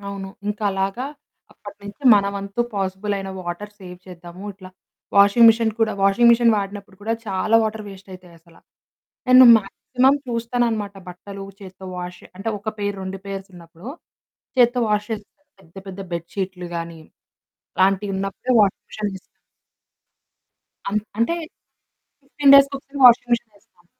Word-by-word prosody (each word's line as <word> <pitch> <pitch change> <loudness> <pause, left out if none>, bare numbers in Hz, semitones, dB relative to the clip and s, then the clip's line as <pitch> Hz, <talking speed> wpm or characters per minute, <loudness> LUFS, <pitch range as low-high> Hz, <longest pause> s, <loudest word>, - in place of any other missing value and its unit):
అవును. 200 -1 -7 0.2
ఇంకలాగా 205 +3 -2 0.5
అప్పటి - - -12
నుంచి 205 +8 -11
మన 200 -1 +2
వంతు 200 +3 -5
పాజిబుల్ 195 +1 -2
అయిన 195 0 -6
వాటర్ 180 +4 -6
సేవ్ 180 -1 -10
చేద్దాము. 175 +1 -12
ఇట్లా 185 -1 -14 0.5
వాషింగ్ 200 +4 +6
మెషీన్ 225 0 +3
కూడా 220 -1 +2
వాషింగ్ 200 +5 +5
మిషన్ 235 -1 +4
వాడినప్పుడు 200 -1 -6
కూడా 225 +2 -1
చాలా 195 +3 -1
వాటర్ 215 -1 -3
వేస్ట్ 195 0 -13
అయితాయసల. 170 -2 -16 0.7
నేను 255 0 +9
మాక్సిమం 255 +6 0
చూస్తాననమాట. 230 -3 -2
బట్టలు 195 +2 -9 0.2
చేత్తో 190 0 -11
వాష్ 180 0 -7
అంటే 195 +4 -5
ఒక 215 +2 -4
పెయిర్, 205 -1 -3
2 190 0 -6
పెయిర్సున్నప్పుడు. 185 -1 -9 0.7
చేత్తో 245 0 +4
వాష్ 210 0 0
చేస్త, 210 -2 -6 0.3
పెద్ద 165 -1 -24
పెద్ద 190 +1 -8
బెడ్‌షీట్లు 180 +1 -5
గానీ, 165 -1 -6 0.8
అలాంటివున్నప్పుడే 195 +4 0
వాషింగ్ 200 -2 +1
మెషీన్‌లో 210 -1 -4
వేస్తాము. 190 - -8 1.7
అన్ 210 - +1 0.2
అంటే 235 +9 +1 0.9
15 280 0 +4
డేస్ 275 0 +7
ఒకసారి 275 +1 -9
వాషింగ్ 245 0 +6
మిషన్‌లో 230 -3 -3
వేస్తామండి. 175 -2 -32
200 Hz, 135 wpm, -21 LUFS, 190-225 Hz, 1.7 s, నేను